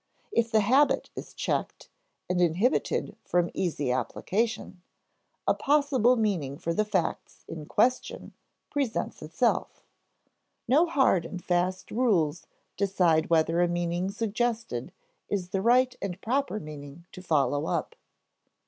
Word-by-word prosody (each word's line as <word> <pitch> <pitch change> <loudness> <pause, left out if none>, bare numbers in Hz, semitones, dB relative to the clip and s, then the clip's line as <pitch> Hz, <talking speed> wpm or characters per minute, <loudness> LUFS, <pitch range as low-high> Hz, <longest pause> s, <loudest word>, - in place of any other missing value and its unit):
If 230 0 +1
the 220 -1 +3
habit 265 +8 +3
is - - -8
checked, - - -2 0.4
and 180 0 0
inhibited 175 +9 +1
from 175 -1 +1
easy 150 -8 -1
application, 195 - -2 0.7
a - - +5
possible 280 -4 +3
meaning 180 - -1
for 170 - -2
the 215 - +2
facts 190 -5 -2
in 155 -2 -7
question 250 +4 0 0.4
presents 275 -6 -2
itself. - - -1 0.8
No 305 +7 +4
hard 265 - +3
and 175 +2 -7
fast 180 +1 0
rules 185 -10 +1 0.3
decide 180 -5 +2
whether 165 +1 +3
a 175 - +4
meaning 175 +1 -1
suggested 225 - -2 0.4
is 185 -3 -2
the 195 0 -1
right 250 +3 +4
and 190 -2 -4
proper 250 0 -1
meaning 150 0 -10
to 185 - -10
follow 145 -3 +1
up. - - -2
185 Hz, 125 wpm, -28 LUFS, 165-230 Hz, 0.8 s, a